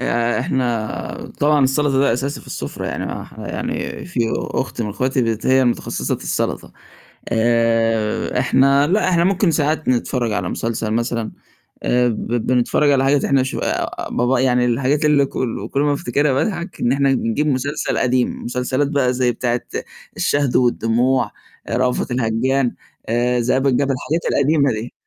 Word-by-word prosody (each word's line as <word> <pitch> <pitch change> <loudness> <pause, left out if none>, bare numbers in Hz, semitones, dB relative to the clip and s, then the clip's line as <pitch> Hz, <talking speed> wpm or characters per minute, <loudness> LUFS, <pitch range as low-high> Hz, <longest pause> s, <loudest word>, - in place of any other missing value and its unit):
آآ، 120 +1 0
إحنا 120 -4 -3
طبعًا 145 -1 +4
السلطة 135 +1 +1
ده 140 -3 +3
أساسي 135 +4 -2
في - - -17
السفرة، - - -5
يعني - - -3 0.4
يعني - - -4
في - - -3 0.2
أخت 125 -2 -3
من 105 - -3
أخواتي 120 -1 0
هي 130 0 +4
متخصصة 120 - -1
في - - -12
السلطة، - - -2 0.6
آآ، 115 -1 +1
إحنا 140 +2 +3
لا 190 +3 +2
إحنا 170 -2 +3
ممكن 190 0 +2
ساعات 155 0 0
نتفرج 125 -1 0
على 105 - -2
مسلسل 115 -1 -2
مثلًا، 115 0 -1 0.5
آآ، 125 0 +2
ب 115 -3 -3 0.2
بنتفرج 130 +4 +2
على 135 -1 +3
حاجات 140 +1 +2
إحنا 135 -1 +3
شو 130 - -4 0.5
ب 125 +2 +1
يعني 125 -1 +2
الحاجات 135 +5 +1
اللي 145 -2 +4
كل 115 -5 -4
كل 140 - 0
ما 145 0 +2
افتكرها 140 +2 0
باضحك، 175 +5 -2
إن 120 - +2
إحنا 140 +1 +2
نجيب 130 +3 0
مسلسل 145 +2 -1
قديم، 125 -1 0
مسلسلات 125 +3 -1
بقى 140 -3 +1
زي 125 -1 +1
بتاعة 120 +1 -1 0.6
الشهد 145 -3 +1
والدموع، 120 0 +2 0.4
رأفت 125 +1 0
الهجان، 125 +2 0 0.6
ذئاب 130 +3 +1
الجبل، 135 +1 +2
الحاجات 155 +6 -2
القديمة 140 -1 +3
دي. 110 +2 -5
130 Hz, 150 wpm, -19 LUFS, 120-140 Hz, 0.6 s, طبعًا